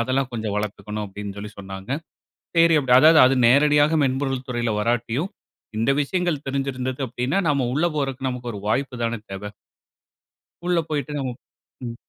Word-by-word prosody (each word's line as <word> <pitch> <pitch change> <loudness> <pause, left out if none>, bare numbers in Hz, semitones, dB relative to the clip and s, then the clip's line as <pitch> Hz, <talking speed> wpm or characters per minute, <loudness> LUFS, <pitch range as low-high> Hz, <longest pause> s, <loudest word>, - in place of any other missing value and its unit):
அதெல்லாம் 130 +2 0
கொஞ்சம் 110 -3 -3
வளர்த்துக்கணும் 105 0 -4
அப்டின்னு 100 0 -7
சொல்லி 105 +1 -6
சொன்னாங்க. 95 +2 -8 0.7
சரி 165 0 +6
அப்டி 130 -3 0
அதாவது 155 +3 +7
அது 135 - +3
நேரடியாக 145 +4 +5
மென்பொருள் 135 -1 -1
துறைல 120 -2 -1
வராட்டியும் 120 - 0 0.5
இந்த 115 +4 +2
விஷயங்கள் 175 -1 -1
தெரிஞ்சு 135 0 -1
இருந்தது 130 +1 -4
அப்டின்னா, 125 +7 -1
நாம 140 -4 +1
உள்ள 155 +5 +2
போறதுக்கு 135 -2 -1
நமக்கு 125 -1 -4
ஒரு 105 - -6
வாய்ப்பு 130 +3 0
தானே 115 0 -1
தேவ? 95 +1 -6 1.2
உள்ள 180 -1 +2
போயிட்டு 145 -1 -2 0.7
ம். 120 -1 -4
130 Hz, 150 wpm, -23 LUFS, 115-145 Hz, 1.2 s, அதாவது